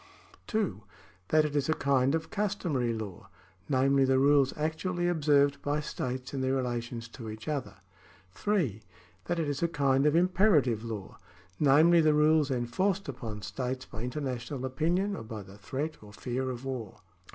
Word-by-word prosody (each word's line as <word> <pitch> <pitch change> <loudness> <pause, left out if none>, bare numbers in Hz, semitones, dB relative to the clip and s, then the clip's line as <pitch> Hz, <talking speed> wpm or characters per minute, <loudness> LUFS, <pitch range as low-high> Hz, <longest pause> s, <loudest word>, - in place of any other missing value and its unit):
(2) 210 - -1 0.5
That 155 0 +4
it 150 -1 -3
is 145 +1 +1
a 160 - +3
kind 135 +1 +2
of 160 0 -4
customary 180 - -1
law, 110 -5 -6 0.4
namely 135 0 +3
the 130 0 +3
rules 140 0 +4
actually 175 +3 -1
observed 145 -4 +3
by 145 +1 0
states 130 -3 -4
in 135 - -2
their 130 0 +1
relations 120 -2 -3
to 115 -2 -8
each 110 +1 -9
other. 150 -3 -3 0.6
(3) 140 - -1 0.4
That 175 - -1
it 165 -2 0
is 145 -1 -2
a 170 - +3
kind 140 -3 +2
of 150 - +3
imperative 170 - +3
law, 110 -4 -7 0.4
namely 155 +4 +6
the 155 -1 +4
rules 150 -1 +4
enforced 175 +11 0
upon 115 -6 -6
states 125 +6 -4
by 110 - -8
international 130 0 -4
opinion 175 +10 0
or - - -6
by 110 -2 -7
the 95 +2 -14
threat 140 - -4
or 105 -1 -13
fear 130 +4 -3
of 125 +1 -6
war. 125 -6 -5
135 Hz, 165 wpm, -30 LUFS, 120-155 Hz, 0.6 s, namely